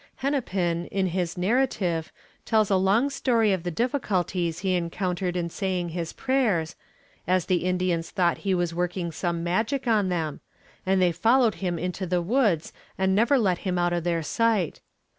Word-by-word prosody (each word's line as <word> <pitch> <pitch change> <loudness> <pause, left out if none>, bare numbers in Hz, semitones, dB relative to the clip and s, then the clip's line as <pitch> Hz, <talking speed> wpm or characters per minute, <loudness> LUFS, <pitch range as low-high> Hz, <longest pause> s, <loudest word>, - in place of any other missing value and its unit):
Hennepin, 190 - -1
in 195 -1 -1
his 180 -1 -2
narrative, 185 -5 0 0.3
tells 215 -3 +2
a - - +5
long 200 +9 +2
story 230 -6 +2
of 185 - -1
the 175 - -3
difficulties 185 - -1
he 185 - +2
encountered 180 +1 -2
in 170 -1 -1
saying 185 -3 -2
his 165 0 -4
prayers, 225 -12 0 0.5
as 185 -1 +2
the 180 -1 0
Indians 180 -2 0
thought 175 -4 +1
he 195 -2 0
was 175 -1 -1
working 175 0 -2
some 170 0 -2
magic 220 +10 0
on 215 -5 +2
them, 160 -4 -2 0.5
and 190 0 +3
they 180 -1 +4
followed 230 +5 +3
him 175 -2 -1
into 180 +2 -3
the 180 0 +1
woods, 205 - +1 0.2
and 190 0 +2
never 230 +7 +4
let 190 -7 +1
him 185 -2 -2
out 175 0 +1
of 175 -1 -1
their 170 -1 0
sight. 215 -1 0
185 Hz, 170 wpm, -26 LUFS, 175-215 Hz, 0.5 s, a